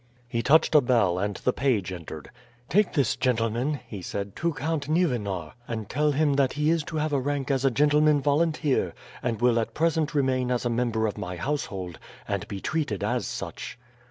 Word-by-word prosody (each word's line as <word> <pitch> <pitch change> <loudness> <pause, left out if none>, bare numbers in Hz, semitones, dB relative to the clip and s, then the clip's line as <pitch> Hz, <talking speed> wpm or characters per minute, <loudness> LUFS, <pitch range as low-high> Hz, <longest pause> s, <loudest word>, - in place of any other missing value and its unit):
He 115 -1 -1
touched 155 +7 +4
a 150 - +7
bell 110 -9 +2
and 100 +1 -1
the 125 - 0
page 110 -9 0
entered. 80 -4 -8 0.4
"Take 210 +2 +3
this 140 -8 +2
gentleman," 125 +3 0
he 100 -4 -7
said, 100 +2 -5
"to 170 +1 0
Count 145 0 -2
Nieuwenar, 105 - 0
and 110 -3 -4
tell 150 +3 +2
him 145 0 +2
that 135 -2 +2
he 150 +1 +2
is 165 -2 +1
to 160 - -6
have 155 0 0
rank 140 0 -1
as 135 -1 +1
a 135 - +5
gentleman 150 +3 +4
volunteer, 150 0 +1 0.3
and 115 -3 -2
will 120 -1 +3
at 115 - -3
present 160 -1 +1
remain 130 -3 +1
as 125 -1 0
a 120 - +1
member 115 -2 0
of 105 -1 -3
my 90 -3 -4
household, 95 - -3 0.3
and - - -2
be 100 - -5
treated 145 - -2
as 120 +3 0
such." - - -6
130 Hz, 190 wpm, -26 LUFS, 110-150 Hz, 0.4 s, a